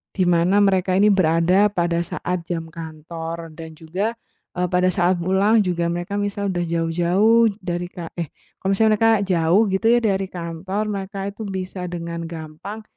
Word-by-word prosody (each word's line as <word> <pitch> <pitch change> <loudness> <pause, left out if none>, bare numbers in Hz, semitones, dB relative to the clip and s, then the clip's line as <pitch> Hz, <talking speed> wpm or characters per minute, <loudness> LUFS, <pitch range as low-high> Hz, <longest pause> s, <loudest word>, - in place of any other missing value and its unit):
di 185 - +2
mana 175 +2 +3
mereka 190 -2 +2
ini 210 +2 +5
berada 180 +2 +3
pada 170 -3 0
saat 175 +1 -3
jam 165 -2 -2
kantor 165 0 -7
dan 160 0 -8
juga, 190 +9 -3 0.4
eee, 180 0 +1
pada 180 +1 +2
saat 180 +1 +2
pulang 200 +5 +3
juga 175 -2 -1
mereka 175 +4 -3
misal 205 0 -2
udah 175 -1 -1
jauh-jauh 175 +7 +3
dari 175 -1 -3
ka 175 -2 -8
eh, 170 - -2 0.3
kalau 190 - -2
misalnya 220 +2 +3
mereka 225 0 +5
jauh 180 0 +3
gitu 190 +4 +1
ya 240 - +5
dari 195 -3 +1
kantor, 180 +3 -4
mereka 195 0 -5
itu 210 +2 -8
bisa 185 -1 -5
dengan 170 -1 -5
gampang 165 +6 -8
180 Hz, 165 wpm, -22 LUFS, 170-195 Hz, 0.4 s, ini